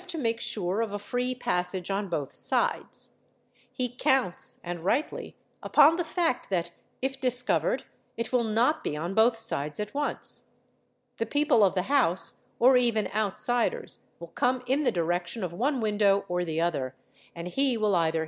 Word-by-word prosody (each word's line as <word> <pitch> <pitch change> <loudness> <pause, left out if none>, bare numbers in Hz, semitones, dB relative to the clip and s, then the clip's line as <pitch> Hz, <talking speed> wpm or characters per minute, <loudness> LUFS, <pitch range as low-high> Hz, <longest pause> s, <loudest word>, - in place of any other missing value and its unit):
to 355 -2 -5
make 230 -5 -1
sure 210 -4 -1
of 225 -3 -2
a 205 - -4
free 245 +4 -2
passage 185 -6 -2
on 200 +1 -1
both 145 -5 -3
sides; - - -2 0.5
he 255 - -2
counts, 250 -6 0
and 175 -1 -5
rightly, 250 - -1 0.3
upon 300 +2 +5
the 350 - -1
fact 325 -3 -1
that 175 -3 -1 0.3
if 270 0 -2
discovered 250 - +1 0.3
it 230 +2 -4
will 245 -2 +3
not 230 +7 +1
be~™ 150 - -3
on 170 +4 -3
both 225 +2 +4
sides 150 -8 -1
at 210 0 -4
once; 290 +1 -3 0.6
the 230 - -1
people 290 -6 +3
of 195 -1 +3
the 185 - +1
house 250 -9 +1
or 255 +2 +6
even 235 -4 +1
outsiders 220 +3 +2 0.2
will 170 0 -9
come 250 +5 0
in 265 +4 +1
the 275 - +2
direction 175 +5 -1
of 175 -2 -3
one 260 +8 0
window 205 -3 +2
or 180 0 -1
the 160 -2 -2
other, 145 -6 -1 0.4
and 170 +1 -6
he 270 +3 +1
will 210 -3 +2
either 165 -1 +1
220 Hz, 170 wpm, -27 LUFS, 180-255 Hz, 0.6 s, or